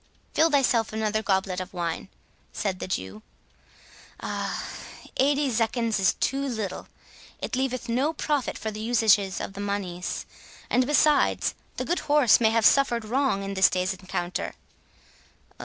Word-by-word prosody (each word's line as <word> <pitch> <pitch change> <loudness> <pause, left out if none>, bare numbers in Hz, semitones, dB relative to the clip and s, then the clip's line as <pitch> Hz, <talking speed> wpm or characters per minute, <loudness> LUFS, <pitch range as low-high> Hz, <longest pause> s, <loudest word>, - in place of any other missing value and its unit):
"Fill 325 +1 +4
thyself 255 -6 +2
another 215 0 0
goblet 190 -3 0
of 185 0 -7
wine," 170 +1 -3 0.4
said 190 -3 -2
the - - -4
Jew. 95 - -4 1.0
"Ah! - - -3 0.5
eighty 285 +2 +3
zecchins 225 -1 0
is 190 - +3
too 270 +1 -1
little. 220 -8 -4 0.5
It - - -3
leaveth 255 -1 -2
no 260 +6 +1
profit 295 -3 -1
for 220 - -4
the 215 - -7
usages 215 -4 +3
of - - -5
the 200 - -6
moneys; 195 -3 -3 0.5
and, 250 0 +3
besides, 295 0 +3 0.2
the - - -2
good 350 - 0
horse 290 -6 +4
may 220 - +5
have 225 0 +2
suffered 240 -5 +4
wrong 245 -3 0
in 195 0 -4
this 190 0 +5
day's 185 +1 0
encounter. 185 -1 -4
220 Hz, 145 wpm, -26 LUFS, 195-260 Hz, 1.0 s, may